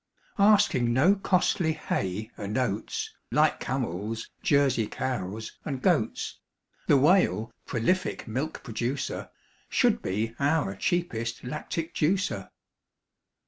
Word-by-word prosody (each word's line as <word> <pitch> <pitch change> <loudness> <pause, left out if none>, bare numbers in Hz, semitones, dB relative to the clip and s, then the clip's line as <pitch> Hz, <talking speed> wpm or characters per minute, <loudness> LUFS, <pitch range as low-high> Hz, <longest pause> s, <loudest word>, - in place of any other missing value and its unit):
Asking 200 - +4
no 150 +11 +5
costly 185 -4 +1
hay 105 - -3
and 105 +2 -4
oats, 115 -5 -2 0.2
Like - - +3
camels, 105 +7 -3
Jersey 135 -6 +3
cows, 110 -4 -3
and 135 -3 -3
goats, - - 0 0.5
The 145 - +6
Whale, 130 - +3 0.2
prolific 180 +11 0
milk 130 +8 -3
producer, 120 +4 -3 0.4
Should - - +3
be 110 +4 -2
our 140 -8 +1
cheapest 115 - -1
lactic 155 +5 -4
juicer. 185 +6 0
130 Hz, 100 wpm, -27 LUFS, 110-160 Hz, 0.5 s, The